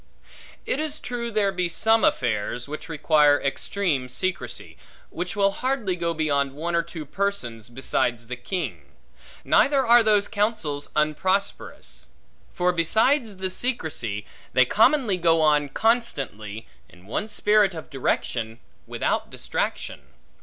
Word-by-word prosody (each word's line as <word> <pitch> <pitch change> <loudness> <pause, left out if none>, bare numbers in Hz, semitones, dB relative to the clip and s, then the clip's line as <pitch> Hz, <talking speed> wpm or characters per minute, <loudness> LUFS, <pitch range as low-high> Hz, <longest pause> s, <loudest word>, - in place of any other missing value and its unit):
It 270 - 0
is 310 -1 -2
true 240 -3 -4
there 210 -3 +1
be 180 -2 -1
some 225 +6 +3
affairs, 120 +1 0
which 150 +3 -7
require 150 -2 +4
extreme 140 -1 -1
secrecy, 185 +9 -3 0.4
which 180 +4 -4
will 200 -1 +3
hardly 245 -5 -1
go 170 -1 -1
beyond 140 -3 0
one 165 +4 -3
or 170 - +3
two 165 -2 -8
persons, 130 - -3
besides 120 -2 0
the 125 +2 -5
king: 115 - -5 0.5
neither 275 -1 +4
are 240 +1 +7
those 210 -2 +3
counsels 205 -9 -1
unprosperous; 185 +6 -1 0.4
for, 180 -1 +1
besides 220 - +2
the 190 0 -2
secrecy, 155 - -2 0.3
they 130 0 +5
commonly 225 - +3
go 165 -2 +3
on 150 -2 +3
constantly, 135 - -1 0.2
in 90 +1 -19
one 135 - -3
spirit 210 -3 +3
of 160 - -9
direction, 115 -4 -2 0.3
without - - -1
distraction. - - -3
170 Hz, 130 wpm, -24 LUFS, 135-210 Hz, 0.5 s, are